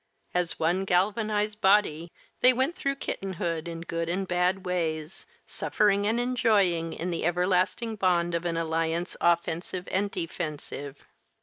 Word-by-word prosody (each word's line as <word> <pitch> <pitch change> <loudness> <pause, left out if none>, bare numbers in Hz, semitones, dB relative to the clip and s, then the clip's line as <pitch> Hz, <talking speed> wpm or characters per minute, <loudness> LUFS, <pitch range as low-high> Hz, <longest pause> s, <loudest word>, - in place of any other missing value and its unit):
As 180 -1 +1
one 175 +4 +1
galvanized 210 +3 +1
body, 185 -5 +3 0.3
they 255 - +6
went 265 +7 0
through 275 -6 -1
kittenhood 170 - -3
in 165 -1 -6
good 165 0 -3
and 190 +2 -1
bad 180 +2 +1
ways, 165 - -3 0.2
suffering 205 -1 +1
and 225 +2 +1
enjoying 205 -9 +2
in 180 +2 -3
the 170 - -2
everlasting 185 +6 +1
bond 175 -3 +2
of 170 0 -1
an 170 -1 -1
alliance 165 +1 -1
offensive 170 +1 0
and 200 +2 +1
defensive. 155 -5 -5
180 Hz, 135 wpm, -27 LUFS, 165-205 Hz, 0.3 s, they